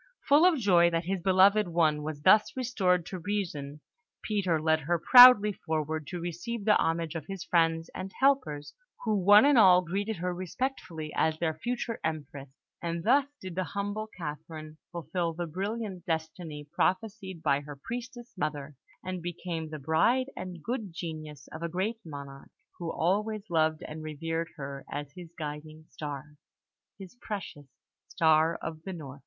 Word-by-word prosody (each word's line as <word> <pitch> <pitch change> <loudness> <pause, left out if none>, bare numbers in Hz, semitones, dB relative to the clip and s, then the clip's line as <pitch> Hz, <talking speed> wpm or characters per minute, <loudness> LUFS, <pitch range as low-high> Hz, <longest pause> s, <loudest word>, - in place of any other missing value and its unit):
Full 300 +5 +6
of 350 -4 +3
joy 180 -7 +4
that 165 0 -1
his 190 0 -2
beloved 195 +2 +5
one 160 -3 +2
was 150 -1 -6
thus 215 +7 +5
restored 190 -9 +1
to 185 - -6
reason, 160 -7 -4 0.4
Peter 190 -6 0
led 160 0 +2
her 170 +4 0
proudly 245 +1 +9
forward 155 -3 -3
to 175 +1 -5
receive 185 +6 -5
the 210 - +5
homage 165 0 -1
of 165 - -6
his 195 -3 -5
friends 165 -1 +1
and 185 +1 -6
helpers, 260 - +1 0.3
who 220 -2 +1
one 205 +5 +7
and 285 -4 +5
all 180 -3 +7
greeted 200 +5 -2
her 180 +1 -2
respectfully 175 - -4
as 160 0 +1
their 160 -1 0
future 235 +7 -3
Empress; 145 -3 -4 0.3
and 170 -1 -3
thus 270 +6 +4
did 185 -5 -7
the 185 +2 -1
humble 205 +3 -4
Catherine 155 -1 -7
fulfil 170 0 -2
the 175 +1 -4
brilliant 195 +2 -4
destiny 160 -2 -4
prophesied 190 0 -1
by 140 -2 +3
her 145 0 -9
priestess 240 - -7
mother, 150 -5 -3 0.3
and 185 -1 -4
become 170 -2 -5
the 155 - -6
bride 195 - +2
and 180 -3 -7
good 225 -5 -3
genius 155 -4 -7
of 160 - -8
a 170 - -2
great 195 +7 -2
monarch, 140 -3 -9 0.3
who 170 -2 -3
always 210 +4 -1
loved 155 -1 +1
and 155 +1 -7
revered 165 +2 -3
her 140 -2 -7
as 145 0 -5
his 175 -2 -10
guiding 155 0 -7
star, 150 0 -7 0.6
his 195 -2 -11
precious 180 -9 -6 0.4
"Star 160 0 +3
of 160 -1 -5
the 190 +3 -6
North!" 145 -5 -9
170 Hz, 160 wpm, -29 LUFS, 155-200 Hz, 0.6 s, proudly